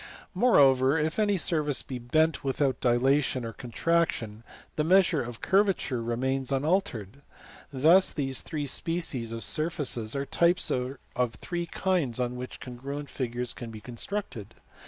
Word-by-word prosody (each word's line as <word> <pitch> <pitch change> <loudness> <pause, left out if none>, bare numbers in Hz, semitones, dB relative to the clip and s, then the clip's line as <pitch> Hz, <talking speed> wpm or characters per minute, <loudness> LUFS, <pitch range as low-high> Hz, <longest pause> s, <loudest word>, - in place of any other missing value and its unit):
Moreover, 135 - +4
if 155 +5 -1
any 205 -2 +2
surface 155 -5 +1
be 130 -2 -6
bent 155 +6 +1
without 135 0 0
dilation 130 +1 +2
or 115 - -6
contraction, 120 -3 -1 0.3
the 150 - 0
measure 185 -1 +4
of 120 -1 -7
curvature 190 - +1
remains 130 +3 -2
unaltered. 135 - -1 0.5
Thus 160 +8 +5
these 135 -3 -2
three 150 -3 -4
species 140 -5 -2
of 115 0 -5
surfaces 145 -8 -1
are 140 0 -2
types 170 +5 +2
of 130 +2 -2 0.4
three 175 +5 -4
kinds 165 -10 -1
on 125 0 -1
which 125 +1 -7
congruent 140 +3 -7
figures 125 -1 -2
can 120 - -8
be 110 -1 -9
constructed. 120 - -6
135 Hz, 135 wpm, -28 LUFS, 120-165 Hz, 0.5 s, Thus